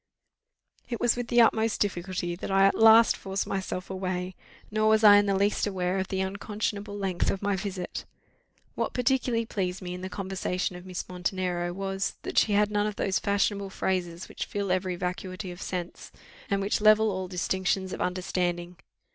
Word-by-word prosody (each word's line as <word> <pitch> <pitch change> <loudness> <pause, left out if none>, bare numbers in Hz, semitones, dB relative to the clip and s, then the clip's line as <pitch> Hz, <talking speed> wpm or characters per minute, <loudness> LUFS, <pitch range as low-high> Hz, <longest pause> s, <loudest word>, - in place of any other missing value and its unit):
It 235 -3 -3
was 240 -1 +3
with 245 -1 -4
the 240 0 +5
utmost 225 -1 +3
difficulty 180 -2 -2
that 175 - -6
I 195 0 +5
at 195 - +5
last 225 0 +7
forced 195 0 -3
myself 190 -1 -4
away, 185 -1 -3 0.4
nor 215 0 +2
was 220 0 +4
I 205 -1 +9
in 205 0 +3
the 195 - +2
least 200 +2 +1
aware 185 -1 -1
of 190 - -2
the 190 0 -2
unconscionable 205 +1 -3
length 190 -3 -1
of 195 - -2
my 200 0 +1
visit. 190 -1 -4 0.7
What - - -3
particularly 250 -2 +1
pleased 190 -5 -2
me 180 -2 -6
in 180 - -7
the 185 - -5
conversation 185 -1 -3
of 180 +1 -10
Miss 185 -1 -5
Montenero 180 -1 -2
was, 195 +1 -3
that - - +2
she 210 - +2
had 210 +1 +3
none 210 0 +1
of 210 - -4
those 190 -2 0
fashionable 200 0 0
phrases 180 -2 -2
which - - -5
fill 200 -2 -2
each 185 - +1 0.2
vacuity 185 +1 -4
of 175 - -10
sense, 180 -2 -5 0.4
and 200 0 +1
which 200 +2 0
level 215 0 +5
all 185 -1 -3
distinctions 190 +1 -1
of - - -5
understanding. 180 -1 -2
195 Hz, 185 wpm, -27 LUFS, 185-205 Hz, 0.7 s, I